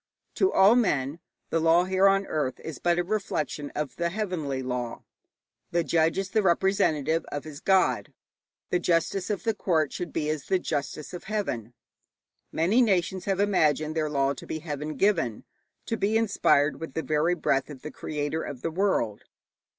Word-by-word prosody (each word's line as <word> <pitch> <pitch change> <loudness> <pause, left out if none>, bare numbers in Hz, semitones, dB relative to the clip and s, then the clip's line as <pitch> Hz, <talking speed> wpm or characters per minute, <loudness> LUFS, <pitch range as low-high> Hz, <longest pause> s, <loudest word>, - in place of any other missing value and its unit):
To 380 - +2
all 200 +5 +6
men 150 - +1 0.3
the 165 - +2
law 165 +2 +4
here 190 +1 +3
on 195 0 +3
earth 145 -7 -2
is 160 - -7
but 175 0 +2
a 175 - +2
reflection 170 -7 -2
of 150 -2 -3
the 170 0 0
heavenly 170 -10 -3
law; 125 -2 -4 0.7
the 170 0 +1
judge 165 0 +2
is 195 0 -2
the 220 - +3
representative 170 -4 +2
of 145 - -4
his 150 -2 -9
god. 130 - +2 0.6
The 180 - +2
justice 175 +3 0
of 205 -3 -2
the 225 -1 +1
court 165 -7 0
should 175 -3 -4
be 150 - -2
as 155 -2 -4
the 190 - +3
justice 150 -2 -4
of 180 - -7
heaven. 130 - -3 0.8
Many 190 +10 +3
nations 190 -4 +1
have 195 -2 0
imagined 155 -6 +2
their 155 -1 0
law 140 -1 +1
to - - -11
be - - -3
heaven 150 -1 -5
given, 190 - +1 0.4
to 225 - -2
be 215 +2 +2
inspired 185 -9 +2
with 160 -4 -7
the 160 - -1
very 155 +3 +1
breath 140 -4 0
of 135 -4 -10
the 155 - -6
Creator 150 +1 -3
of 130 -3 -7
the 165 - -1
world. 160 - 0
165 Hz, 180 wpm, -27 LUFS, 145-190 Hz, 0.8 s, all